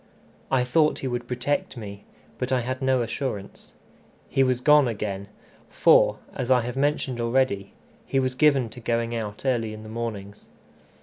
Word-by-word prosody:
I 130 -2 +3
thought 150 +5 +2
he 135 - -4
would 120 -1 -3
protect 125 +2 -2
me, 100 -2 -8 0.3
but 125 - -2
I 130 -1 +2
had 130 +2 -4
no 130 -2 +2
assurance. 115 -4 -5 0.6
He 135 - +2
was 130 -2 +2
gone 150 0 +5
again, 100 -3 -4 0.4
for, - - +5 0.2
as 125 -1 -4
I 125 -1 +5
have 120 +2 -5
mentioned 135 -3 0
already, 115 -5 0 0.3
he 135 - +1
was 130 -1 0
given 135 -2 +3
to 120 - -11
going 115 0 -1
out 110 0 -5
early 115 -4 0
in 110 - -10
the 110 - -10
mornings. 110 -3 -6
125 Hz, 170 wpm, -25 LUFS, 110-130 Hz, 0.6 s, gone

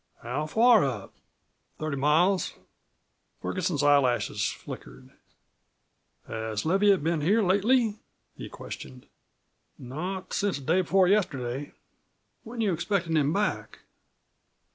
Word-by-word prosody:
"How 135 +6 -3
far 225 +5 +5
up?" 120 -8 -4 0.6
"Thirty 155 -2 -3
miles." 160 +7 +2 0.8
Ferguson's 180 -6 -2
eyelashes 140 -4 +2
flickered. 60 +1 -10 1.2
"Has 110 0 -4
Leviatt 195 0 +3
been 165 -1 0
here 205 +9 +3
lately?" 215 +3 +2 0.4
he - - -8
questioned. 125 -1 -9 0.7
"Not 180 +9 -6
since 205 -5 0
the 140 - -10
day 175 +6 +3
before 185 +1 +3
yesterday." 145 -9 -1 0.7
"When 230 +1 -6
you 205 -4 +1
expectin' 170 -1 -1
him 150 -1 +2
back?" 205 +4 -2
165 Hz, 105 wpm, -27 LUFS, 140-195 Hz, 1.2 s, far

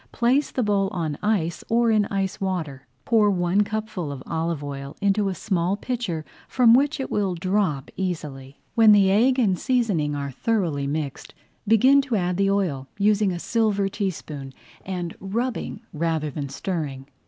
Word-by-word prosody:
Place 255 +5 +2
the 255 - -1
bowl 200 -2 +2
on 170 -7 -3
ice 195 -6 0
or 230 0 +3
in 210 -2 +3
ice 195 -1 -2
water. 160 -8 -3 0.2
Pour 220 -3 +4
one 180 +1 +2
cupful 210 -7 -4
of 135 -2 -7
olive 165 -2 -2
oil 140 0 -7
into 200 0 +2
a 190 - -3
small 185 0 0
pitcher 210 -10 -3 0.2
from 240 -3 +5
which 285 +4 +3
it 265 - -4
will 195 -3 0
drop 180 -6 -1
easily. 145 -7 -5
When 225 -2 +7
the 195 -2 +5
egg 245 +6 +4
and 200 -8 +2
seasoning 205 - +1
are 140 -1 -4
thoroughly 165 - -1
mixed, 145 -1 -4 0.3
begin 255 +6 +6
to 265 -4 -2
add 180 -2 0
the 195 0 +2
oil, 175 -10 0
using 205 -1 +3
a 175 - -3
silver 210 0 +1
teaspoon, 155 -9 -5 0.3
and 180 -3 -4
rubbing 225 +3 -3
rather 160 -1 -1
than 140 0 -5
stirring. 140 -3 -4
190 Hz, 165 wpm, -24 LUFS, 155-215 Hz, 0.3 s, When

